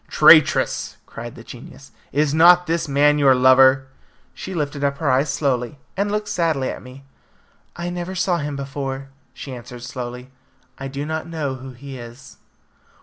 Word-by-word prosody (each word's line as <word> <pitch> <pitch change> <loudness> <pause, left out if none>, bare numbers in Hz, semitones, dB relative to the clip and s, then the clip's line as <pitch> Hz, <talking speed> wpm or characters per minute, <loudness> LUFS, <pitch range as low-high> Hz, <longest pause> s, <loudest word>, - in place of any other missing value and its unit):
"Traitress!" - - +4
cried 120 +1 -9
the 115 - -12
genius, 130 +3 -12 0.2
"is 145 +1 +1
not 175 +3 +6
this 165 -1 -1
man 145 +1 +3
your 135 -2 +5
lover?" 130 +1 +5 0.5
She 190 - -7
lifted 145 -2 -3
up 140 0 0
her 145 -3 0
eyes 135 +3 +2
slowly, 135 -1 -1 0.2
and 200 +1 -1
looked 210 0 -2
sadly 160 -9 0
at - - -8
me. 130 +2 -13 0.7
"I 175 +1 -4
never 175 +1 -5
saw 185 -1 +1
him 145 -1 -4
before," 135 -1 -5 0.2
she 135 - -9
answered 120 0 -10
slowly. 125 0 -7 0.5
"I 135 - -5
do 140 +2 -5
not 160 +1 -4
know 155 -5 -3
who 130 0 -9
he 135 +1 -10
is." 120 +2 -12
140 Hz, 165 wpm, -21 LUFS, 130-160 Hz, 0.7 s, not